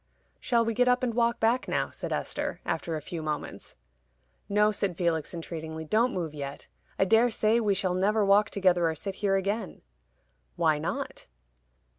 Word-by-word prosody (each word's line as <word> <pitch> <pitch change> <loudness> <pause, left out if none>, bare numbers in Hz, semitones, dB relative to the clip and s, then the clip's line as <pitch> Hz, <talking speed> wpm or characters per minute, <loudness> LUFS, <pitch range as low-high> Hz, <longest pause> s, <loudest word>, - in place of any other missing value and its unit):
"Shall 235 -2 +2
we 230 - 0
get 250 +3 +2
up 250 0 +3
and 240 -2 0
walk 235 0 +1
back 235 +3 +2
now?" - - -1
said - - -6
Esther, - - -3
after 165 - -2
a 155 - -5
few 165 +2 -5
moments. 155 -1 -5 0.7
"No," 210 +1 +4
said 195 -4 -2
Felix, 165 -3 0
entreatingly. 160 -2 -6
"Don't 230 +9 +2
move 165 -4 -3
yet. 140 -1 -6 0.3
I 190 - +3
dare 225 +5 +4
say 220 0 +2
we 210 -3 +1
shall 185 -2 0
never 205 +3 +2
walk 205 +1 +4
together 180 -4 +2
or 160 - -3
sit 195 +5 -5
here 195 -2 +2
again." 200 +4 -2 0.7
"Why 155 -2 +2
not?" 155 - -4
195 Hz, 175 wpm, -28 LUFS, 165-225 Hz, 0.7 s, No